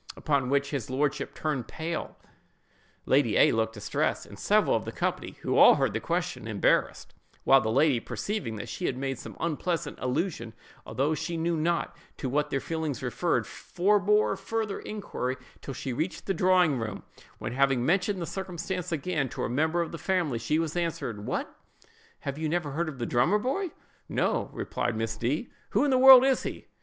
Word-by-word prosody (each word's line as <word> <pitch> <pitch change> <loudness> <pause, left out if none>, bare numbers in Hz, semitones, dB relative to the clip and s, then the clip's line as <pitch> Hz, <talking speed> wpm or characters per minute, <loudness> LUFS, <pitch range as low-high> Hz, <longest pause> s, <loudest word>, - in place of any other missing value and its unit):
—upon 140 -5 0
which 140 0 +1
his 135 -6 -3
lordship 140 +2 -1
turned 145 -6 -2
pale, 160 0 -5 0.9
Lady - - +3
A—— - - +6
looked 110 0 0
distressed, 105 - -1
and - - -13
several - - +3
of - - -1
the - - -5
company - - -3
(who - - +1
all - - +9
heard - - 0
the - - -1
question) - - -2
embarrassed; - - +1 0.3
while 135 0 +6
the 110 -1 -1
lady, 135 0 +3
perceiving 135 - -4
that 105 - -6
she 180 - -3
had 125 - -2
made 135 -2 -3
some - - -9
unpleasant 170 +1 -2
allusion, 125 - -2 0.3
although 135 +8 0
she 170 +2 -3
knew 165 +1 0
not 170 +2 0 0.2
to 135 - -3
what 150 +3 0
their 135 - 0
feelings 155 -5 -3
referred, 130 +8 0
forbore 205 +3 +2
further 220 -3 -3
inquiry 130 -11 -4 0.2
till 135 - -6
she 130 0 -4
reached 160 +8 -3
the 195 - 0
drawing 180 -6 +3
room, 110 -2 -5 0.3
when, - - -5
having 135 -2 +2
mentioned 190 +4 +1
the 170 - -2
circumstance 180 -1 -4
again 150 -3 -1
to - - -4
a - - -1
member 160 +7 +1
of 165 - -7
the 165 - -7
family, 165 -7 0
she 115 +7 0
was 165 -1 -1
answered, 140 -11 -3
"What! - - -3 0.7
have 140 +1 -4
you 155 -1 -1
never 165 -3 -1
heard 160 +3 -1
of 140 - -8
the 120 - -2
drummer 125 - +3
boy?"—"No," 295 - -2
replied 120 -2 -2
Miss 115 0 -2
D——; 140 - -2 0.2
"who 215 - +2
in 285 - +2
the 260 - +4
world 265 -1 +10
is 270 -1 +3
he?" - - -6
155 Hz, 185 wpm, -28 LUFS, 130-180 Hz, 0.9 s, world